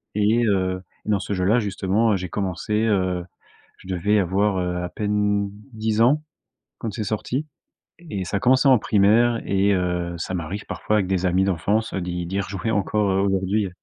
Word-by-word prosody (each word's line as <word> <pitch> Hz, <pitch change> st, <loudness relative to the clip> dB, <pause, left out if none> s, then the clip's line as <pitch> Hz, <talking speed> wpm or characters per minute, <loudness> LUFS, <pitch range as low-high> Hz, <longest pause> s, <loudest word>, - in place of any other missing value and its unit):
Et, 110 Hz, +3 st, +3 dB
heu, 95 Hz, -2 st, 0 dB, 0.2 s
et -, -, -5 dB
dans 105 Hz, -, +2 dB
ce 105 Hz, -, -6 dB
jeu 90 Hz, -1 st, -1 dB
là, 115 Hz, +5 st, +4 dB
justement, 105 Hz, +1 st, +1 dB
j'ai 90 Hz, 0 st, -5 dB
commencé, 100 Hz, +2 st, -3 dB
heu, 95 Hz, -4 st, +1 dB, 0.6 s
je 95 Hz, -, -15 dB
devais 100 Hz, +3 st, +2 dB
avoir, 95 Hz, +2 st, +1 dB
heu, 90 Hz, -1 st, -1 dB
à 90 Hz, -, -3 dB
peine 105 Hz, 0 st, 0 dB, 0.2 s
10 110 Hz, -1 st, -1 dB
ans 145 Hz, +6 st, +4 dB, 0.6 s
quand 115 Hz, -, -4 dB
c'est 110 Hz, -, -3 dB
sorti 115 Hz, +8 st, -2 dB, 0.6 s
et 95 Hz, -2 st, -3 dB
ça 100 Hz, +3 st, -2 dB
commençait 130 Hz, +2 st, +4 dB
en 130 Hz, -3 st, +7 dB
primaire 110 Hz, +4 st, +3 dB
et, 100 Hz, +1 st, +2 dB
heu, 90 Hz, -2 st, -1 dB
ça 95 Hz, -, -4 dB
m'arrive 90 Hz, +4 st, -4 dB
parfois 105 Hz, -, -1 dB
avec 100 Hz, -3 st, +1 dB
des 95 Hz, -1 st, 0 dB
amis 90 Hz, +2 st, +2 dB
d'enfance, 100 Hz, +4 st, 0 dB
d'y 90 Hz, -2 st, -3 dB
d'y 95 Hz, +3 st, -2 dB
rejouer, 100 Hz, +2 st, -3 dB
encore, 105 Hz, 0 st, +1 dB
heu, 95 Hz, +1 st, +2 dB
aujourd'hui. 95 Hz, +1 st, +1 dB
100 Hz, 180 wpm, -23 LUFS, 95-105 Hz, 0.6 s, en